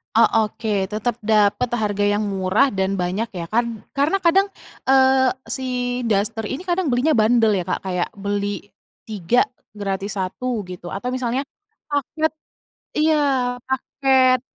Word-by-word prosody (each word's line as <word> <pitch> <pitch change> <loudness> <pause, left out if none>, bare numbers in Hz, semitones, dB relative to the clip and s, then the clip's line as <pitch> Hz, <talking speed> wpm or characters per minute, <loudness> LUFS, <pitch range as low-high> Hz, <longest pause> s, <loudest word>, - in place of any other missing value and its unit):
Oh, 230 - +6 0.2
oke, 215 +1 -5 0.2
tetap 220 +2 -1
dapet 215 +2 +3
harga 205 -3 0
yang 205 +1 +2
murah 195 +8 +2
dan 190 -3 -1
banyak 185 +6 -1
ya 170 -2 -5
kan. 230 -1 -1 0.2
Karena 320 +8 +2
kadang, 380 +3 +4 0.4
eee, 265 -1 +4 0.2
si 265 - -3 0.4
daster 215 +1 0
ini 265 +8 -4
kadang 365 0 -1
belinya 255 +2 +2
bundel 225 +1 +4
ya 175 - -2
Kak, - - -2
kayak 180 -2 -1
beli 205 0 -3 0.4
3 215 +4 +2 0.3
gratis 200 -1 -3
1 235 +5 -2
gitu, 175 -1 -7
atau 245 +6 -3
misalnya 255 0 -1 0.5
paket 305 +2 0 0.7
iya, 310 0 +4 0.5
paket. 265 -1 +2
225 Hz, 135 wpm, -21 LUFS, 200-265 Hz, 0.7 s, Oh